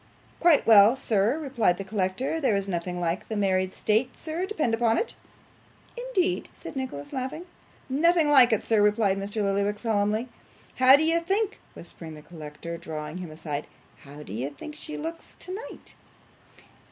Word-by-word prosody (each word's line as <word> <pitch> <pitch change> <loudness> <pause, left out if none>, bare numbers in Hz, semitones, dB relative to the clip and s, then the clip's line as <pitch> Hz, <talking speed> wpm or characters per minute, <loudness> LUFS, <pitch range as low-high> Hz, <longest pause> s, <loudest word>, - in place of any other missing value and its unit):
'Quite 340 -4 +4
well, 215 +1 +7
sir,' 225 0 +1
replied 255 - +1
the 195 - -4
collector. 205 +10 -2
'There 245 -7 +2
is 200 0 -1
nothing 180 -1 -3
like 175 +1 -2
the 220 - -4
married 190 -2 +1
state, 225 +6 0
sir, 335 +4 -3
depend 310 - -1
upon 225 0 +2
it.' 465 - -2 0.8
'Indeed!' 450 -8 -1
said - - -9
Nicholas, 260 - -5
laughing. 265 +5 -4
'Ah! - - -23 0.4
nothing 320 +4 +3
like 260 -4 +7
it, 220 - +1
sir,' 220 -2 +2
replied 205 -1 +2
Mr. 205 +2 -3
Lillyvick 200 +1 0
solemnly. 215 +1 0 0.5
'How 255 +1 +8
do 295 - +2
you 330 +1 +3
think,' 390 +5 -1 0.2
whispered 165 -2 -10
the 150 - -12
collector, 165 +1 -8
drawing 155 -1 -6
him 180 -3 -7
aside, 155 -2 -5 0.3
'how 145 +2 -12
do 100 - -9
you 125 +6 -3
think 225 - -10
she 305 +1 -6
looks 330 +2 -7
tonight? 380 +5 -9
215 Hz, 165 wpm, -26 LUFS, 185-295 Hz, 0.8 s, How